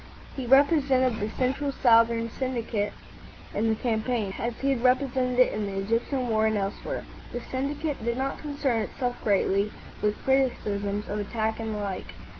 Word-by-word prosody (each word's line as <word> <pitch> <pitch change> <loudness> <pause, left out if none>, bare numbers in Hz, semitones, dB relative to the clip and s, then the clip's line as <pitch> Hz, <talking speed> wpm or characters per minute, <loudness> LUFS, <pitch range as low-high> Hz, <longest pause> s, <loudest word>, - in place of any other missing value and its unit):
He 260 -3 -4
represented 270 -3 +4
the 210 - -2
Central 270 +4 -1
Southern 230 -2 +4
Syndicate 235 -5 -2 0.6
in 225 +2 +1
the 220 - +2
campaign, 220 -3 -1
as 235 0 -2
he 275 0 +1
had 255 -3 0
represented 255 -1 +2
it 255 - +5
in 210 -1 -2
the 195 0 -3
Egyptian 230 +5 0
war, 220 -1 +2
and 220 -1 +1
elsewhere. 195 0 -3 0.3
The 245 - -3
syndicate 280 +1 -2
did 235 +1 -1
not 270 +1 -2
concern 285 -6 -1
itself 245 +3 -3
greatly 200 0 +2 0.3
with 210 0 +1
criticisms 210 -6 0
of 210 - -2
attack 220 +2 -2
and 220 -1 -3
the - - -3
like. 190 - -5
235 Hz, 165 wpm, -27 LUFS, 215-260 Hz, 0.6 s, it